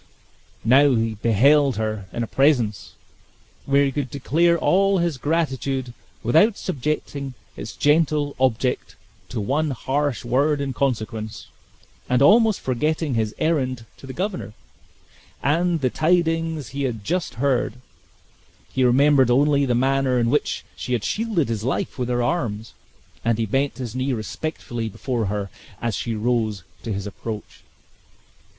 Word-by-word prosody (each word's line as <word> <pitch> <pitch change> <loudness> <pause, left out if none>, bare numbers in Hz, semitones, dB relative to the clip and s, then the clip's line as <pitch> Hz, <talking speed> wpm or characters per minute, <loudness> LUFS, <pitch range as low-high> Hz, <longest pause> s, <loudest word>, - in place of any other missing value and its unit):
Now 135 +3 +5
he 115 0 0
beheld 130 +6 +4
her 110 -3 -3
in 120 - -2
a - - -1
presence, 125 -5 +1 0.7
where 140 +1 +4
he 135 - 0
could 140 -1 -3
declare 165 +6 +2
all 195 +3 +3
his 170 -6 0
gratitude 135 -4 -1 0.3
without 165 - +4
subjecting 140 -3 -3 0.2
its 110 - -7
gentle 150 -1 +2
object 130 -1 0 0.3
to 120 - -4
one 140 +9 0
harsh 135 0 -1
word 140 +5 +2
in 140 -2 -2
consequence, 110 -4 -3 0.6
and 125 - +3
almost 220 +3 +5
forgetting 150 +3 -1
his 110 -2 -1
errand 130 -7 0
to 135 - -12
the - - -5
governor, 185 - -3 0.9
and 165 +3 +1
the 130 -2 +1
tidings 165 -4 +1
he 140 +3 -5
had 120 -6 -2
just 180 - -2
heard, 130 -2 +1 1.0
he 130 - +2
remembered 135 +1 +5
only 140 +2 +3
the 120 - +2
manner 135 0 +2
in 120 -1 +2
which 150 - 0
she 125 - -4
had 115 -4 0
shielded 215 - 0
his 110 -2 -3
life 130 +2 -2
with 125 -1 -1
her 120 -1 +1
arms, 115 -8 -2 0.5
and 115 -1 +1
he 115 - 0
bent 135 +6 0
his 125 -4 -5
knee 130 +1 -1
respectfully 120 0 -4
before 120 +1 -2
her 100 -1 -3 0.3
as 115 -1 -2
she 115 -2 -3
rose 110 -3 0 0.2
to 115 - -5
his 100 0 -3
approach. 105 +1 -7
130 Hz, 145 wpm, -23 LUFS, 115-150 Hz, 1.0 s, Now